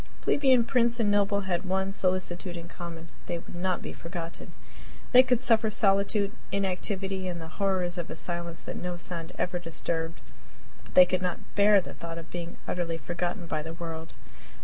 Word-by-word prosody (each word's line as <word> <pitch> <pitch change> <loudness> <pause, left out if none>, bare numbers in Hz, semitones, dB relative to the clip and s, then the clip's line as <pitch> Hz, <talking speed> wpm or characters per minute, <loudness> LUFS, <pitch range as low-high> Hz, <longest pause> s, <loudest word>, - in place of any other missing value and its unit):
Plebeian, 260 -4 +4
prince, 235 -1 +3
and 210 -3 +3
noble 200 0 +3
had 180 -3 -1
one 190 +1 0
solicitude 185 -2 +1
in 170 0 -7
common 170 -1 -8 0.2
they 175 - -1
would 165 - -11
not 180 0 -1
be - - -5
forgotten! 170 0 -7 0.6
They 255 - +10
could 250 -2 +2
suffer 225 -3 +3
solitude, 200 0 +2 0.2
inactivity, 190 0 -1
and 175 -1 -3
the 160 - -7
horrors 185 -3 +1
of 170 - -4
a - - -5
silence 170 -1 -4
that - - -5
no 180 0 -3
sound 170 -1 -5
ever 180 0 -1
disturbed, 165 0 -3 0.6
but - - -16
they 180 - +10
could 185 0 0
not 180 -2 -4
bear 205 0 +6
the - - -9
thought 165 0 -7
of 165 0 -9
being 175 -1 -5
utterly 170 -2 -1
forgotten 175 +3 -3
by 155 -2 -2
the 160 +2 -6
world. 165 -2 -6
180 Hz, 180 wpm, -28 LUFS, 170-200 Hz, 0.6 s, They